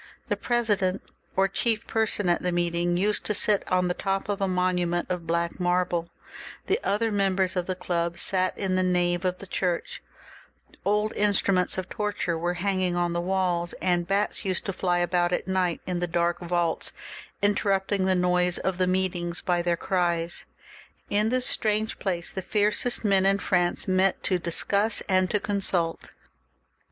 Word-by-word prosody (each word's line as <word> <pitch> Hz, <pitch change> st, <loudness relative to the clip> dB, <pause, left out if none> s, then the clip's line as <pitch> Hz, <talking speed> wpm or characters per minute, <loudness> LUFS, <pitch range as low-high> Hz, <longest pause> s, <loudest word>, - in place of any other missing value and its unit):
The -, -, +1 dB
president 205 Hz, -6 st, 0 dB, 0.3 s
or 195 Hz, +1 st, +3 dB
chief 220 Hz, +3 st, 0 dB
per 220 Hz, -1 st, 0 dB
son 205 Hz, -2 st, 0 dB
at 175 Hz, -, +2 dB
the 180 Hz, -, 0 dB
meeting 175 Hz, 0 st, 0 dB
used 210 Hz, +3 st, +1 dB
to 210 Hz, -, +1 dB
sit 205 Hz, 0 st, +3 dB
on 180 Hz, 0 st, +2 dB
the 180 Hz, -, 0 dB
top 195 Hz, +2 st, -2 dB
of 200 Hz, 0 st, -2 dB
a 195 Hz, -, +2 dB
monument 180 Hz, -1 st, 0 dB
of 175 Hz, -2 st, -3 dB
black 170 Hz, +1 st, -1 dB
marble, 175 Hz, -1 st, 0 dB, 0.6 s
the 400 Hz, +4 st, +1 dB
other 225 Hz, +2 st, 0 dB
members 195 Hz, -2 st, +1 dB
of 180 Hz, -1 st, -1 dB
the 185 Hz, -, -2 dB
club 170 Hz, -2 st, -2 dB
sat 185 Hz, +1 st, +1 dB
in 190 Hz, -2 st, -1 dB
the 185 Hz, -, +2 dB
nave 175 Hz, -1 st, +1 dB
of 180 Hz, 0 st, 0 dB
the 200 Hz, -, -10 dB
church, 180 Hz, -2 st, -2 dB, 0.8 s
old 210 Hz, +1 st, +1 dB
instruments 200 Hz, -3 st, +2 dB
of 185 Hz, 0 st, -3 dB
torture 210 Hz, -5 st, -2 dB
were 175 Hz, +2 st, -2 dB
hang 190 Hz, +1 st, -1 dB
ing 180 Hz, -1 st, +1 dB
on 175 Hz, -1 st, 0 dB
the 170 Hz, -, -1 dB
walls, 180 Hz, -2 st, -1 dB
and 175 Hz, -2 st, +1 dB
bats 200 Hz, +4 st, 0 dB
used 185 Hz, -3 st, -1 dB
to 195 Hz, -, -2 dB
fly 180 Hz, -1 st, 0 dB
about 175 Hz, 0 st, +1 dB
at 180 Hz, -, -2 dB
night 185 Hz, -2 st, 0 dB
in 180 Hz, -1 st, -2 dB
the 175 Hz, -, -1 dB
dark 170 Hz, 0 st, 0 dB
vaults, 175 Hz, -2 st, -1 dB, 0.5 s
interrupting 200 Hz, -1 st, +1 dB
the 190 Hz, 0 st, +3 dB
noise 180 Hz, 0 st, +2 dB
of 190 Hz, -1 st, -2 dB
the 185 Hz, -, +3 dB
meetings 180 Hz, -2 st, 0 dB
by 175 Hz, -1 st, 0 dB
their 170 Hz, 0 st, 0 dB
cries. 170 Hz, -2 st, -1 dB, 0.7 s
In 210 Hz, +2 st, +2 dB
this 255 Hz, +1 st, 0 dB
strange 215 Hz, 0 st, +1 dB
place 175 Hz, -3 st, -1 dB
the 190 Hz, -, -4 dB
fiercest 210 Hz, +4 st, +1 dB
men 195 Hz, -2 st, +4 dB
in 195 Hz, +1 st, +3 dB
France 175 Hz, -2 st, 0 dB
met 185 Hz, 0 st, +2 dB
to 185 Hz, -2 st, +1 dB
discuss 200 Hz, +5 st, +1 dB
and 185 Hz, -1 st, +2 dB
to 210 Hz, -, +1 dB
consult. 190 Hz, -5 st, -1 dB
185 Hz, 180 wpm, -26 LUFS, 175-200 Hz, 0.8 s, men